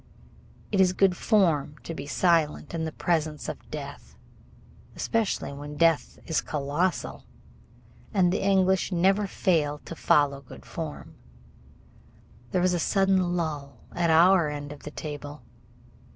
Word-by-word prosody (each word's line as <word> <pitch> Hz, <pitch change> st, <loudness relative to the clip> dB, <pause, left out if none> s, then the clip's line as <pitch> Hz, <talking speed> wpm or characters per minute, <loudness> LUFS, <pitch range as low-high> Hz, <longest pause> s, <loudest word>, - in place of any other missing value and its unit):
It 200 Hz, -2 st, +3 dB
is 185 Hz, -1 st, +4 dB
good 190 Hz, -1 st, +3 dB
form 165 Hz, -9 st, +2 dB
to 165 Hz, -, -5 dB
be 150 Hz, -, -7 dB
silent 165 Hz, -2 st, +1 dB
in 165 Hz, -1 st, -2 dB
the 160 Hz, -, -3 dB
presence 155 Hz, -2 st, -1 dB
of -, -, -7 dB
death, -, -, -8 dB, 0.8 s
especially 225 Hz, -10 st, -1 dB
when 145 Hz, +1 st, -8 dB
death 165 Hz, -1 st, +2 dB
is 160 Hz, -, 0 dB
colossal, 150 Hz, +5 st, -2 dB, 0.8 s
and 185 Hz, -4 st, +3 dB
the -, -, -1 dB
English 190 Hz, -1 st, +2 dB
never 190 Hz, +3 st, +2 dB
fail 155 Hz, -7 st, +1 dB
to 165 Hz, -, -7 dB
follow 140 Hz, -3 st, +2 dB
good 130 Hz, -, -13 dB
form. -, -, -7 dB, 1.4 s
There 180 Hz, -, 0 dB
was 180 Hz, 0 st, +2 dB
a 175 Hz, -, 0 dB
sudden 190 Hz, -1 st, +2 dB
lull 145 Hz, -6 st, -4 dB
at 175 Hz, -1 st, 0 dB
our 170 Hz, 0 st, +5 dB
end 145 Hz, 0 st, -6 dB
of 150 Hz, -, -10 dB
the -, -, -7 dB
table. 145 Hz, -1 st, -7 dB
165 Hz, 135 wpm, -27 LUFS, 150-185 Hz, 1.4 s, our